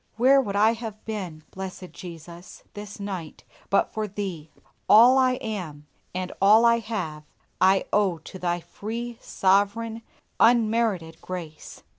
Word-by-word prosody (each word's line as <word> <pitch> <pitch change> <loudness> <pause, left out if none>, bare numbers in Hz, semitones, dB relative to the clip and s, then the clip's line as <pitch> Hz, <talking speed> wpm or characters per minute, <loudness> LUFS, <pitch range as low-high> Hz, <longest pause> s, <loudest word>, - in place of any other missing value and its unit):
Where 270 +4 +5
would 200 -6 -4
I 215 +3 +4
have 225 -2 -8
been, 185 -8 -5
Blessed 185 -1 -7
Jesus! 170 0 -11
this 205 0 -9
night, 190 -6 -6 0.3
but 200 - +2
for 215 -1 -2
Thee! 185 -6 -5 0.4
All 245 +5 +8
I 255 -1 +3
am, 180 -12 -5 0.3
and 185 0 -3
all 215 +4 +6
I 235 0 +5
have, 200 -9 -4 0.4
I 190 +1 +4
owe 200 -5 +2
to 175 +4 -11
Thy 175 -1 -1
free, 230 +6 -6
sovereign, 205 +4 +1 0.4
unmerited 220 -8 +2
grace. 170 -4 -8
200 Hz, 135 wpm, -25 LUFS, 180-225 Hz, 0.4 s, All